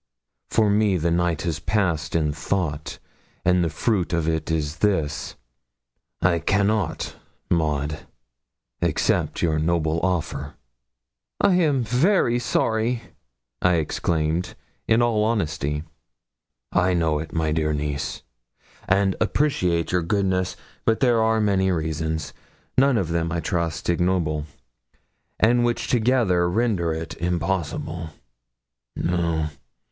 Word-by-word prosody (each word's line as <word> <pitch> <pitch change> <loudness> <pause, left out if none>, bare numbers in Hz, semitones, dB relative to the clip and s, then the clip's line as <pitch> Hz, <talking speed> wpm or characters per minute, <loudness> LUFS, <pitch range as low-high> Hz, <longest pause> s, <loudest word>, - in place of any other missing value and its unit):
'For 110 - +3
me 105 -2 +3
the 85 0 0
night 85 -2 +1
has 85 -3 -2
passed 85 -6 0
in 75 -2 +1
thought, 75 -2 -2 0.5
and 90 0 +4
the 85 - +1
fruit 95 +2 0
of 85 -2 0
it 80 -1 -1
is 80 -1 -1
this 80 -9 0 0.9
I 85 -1 +3
cannot, 100 +6 0 0.3
Maud, 75 -2 0 0.8
accept - - 0
your 80 -2 +2
noble 80 0 +1
offer.' 75 -6 -2 0.8
'I 200 - +4
am 150 -8 +2
very 125 - +2
sorry,' 115 0 0 0.6
exclaimed 85 0 0 0.3
I, - - +6
in 115 - +3
all 110 -3 +2
honesty. 80 -9 -1 0.9
'I 90 0 +2
know 80 -3 +1
it, 80 - -6
my 80 -2 0
dear 75 -1 +1
niece, 75 -1 -3 0.7
and 95 0 +3
appreciate 90 - +1
your 90 -1 +2
goodness; 95 0 0 0.3
but 115 -1 +2
there 120 -4 +4
are 110 0 +2
many 100 -3 +2
reasons 80 -2 -2 0.4
none 135 -1 +4
of 95 -6 -1
them, 85 0 -1
I 85 - -1
trust, 85 -2 -2
ignoble 85 -4 +1 0.9
and 120 +2 +4
which 120 0 -1
together 110 -8 +2
render 100 -5 +1
it 80 0 -4
impossible. 85 -1 -2 0.9
No. 85 -3 0
85 Hz, 120 wpm, -24 LUFS, 80-105 Hz, 0.9 s, I